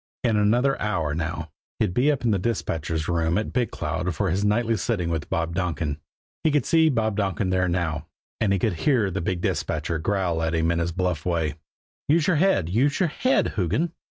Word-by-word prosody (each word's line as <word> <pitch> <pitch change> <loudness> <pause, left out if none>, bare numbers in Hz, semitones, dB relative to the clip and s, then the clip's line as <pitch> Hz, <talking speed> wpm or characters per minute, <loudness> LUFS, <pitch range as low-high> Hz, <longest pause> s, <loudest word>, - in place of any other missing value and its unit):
In 115 -3 +2
another 120 +6 +2
hour 85 -9 0
now 80 +1 -3 0.3
he'd 105 -5 0
be 130 +9 +3
up 135 -4 -2
in 115 - +3
the 100 - +1
dispatcher's 80 -7 -2
room 85 0 +1
at 105 - -2
Big 125 -2 +1
Cloud 80 +3 -3
for 95 +1 0
his 95 +3 0
nightly 115 +2 +2
sitting 90 -4 -1
with 80 -2 -3
Bob 85 0 -1
Donkin. 85 -5 -2 0.4
He 160 - +4
could 150 -4 +1
see 160 -1 +4
Bob 110 -6 0
Donkin 95 -1 0
there 90 0 +2
now; 80 -3 -1 0.3
and 110 -3 +2
he 100 - +3
could 105 +2 0
hear 110 - +1
the 95 - -2
big 85 +1 -2
dispatcher 85 -2 -1
growl 90 -2 0
at 80 0 0
him 80 +1 +2
in 85 - 0
his 85 +1 -1
bluff 90 -3 -1
way: 85 -4 0 0.5
"Use 155 +2 +3
your 180 -3 +3
head 175 - +3
use 125 +11 +1
your 180 -4 +2
head 255 - +1
_Hoogan! 105 - 0
95 Hz, 210 wpm, -24 LUFS, 85-115 Hz, 0.5 s, He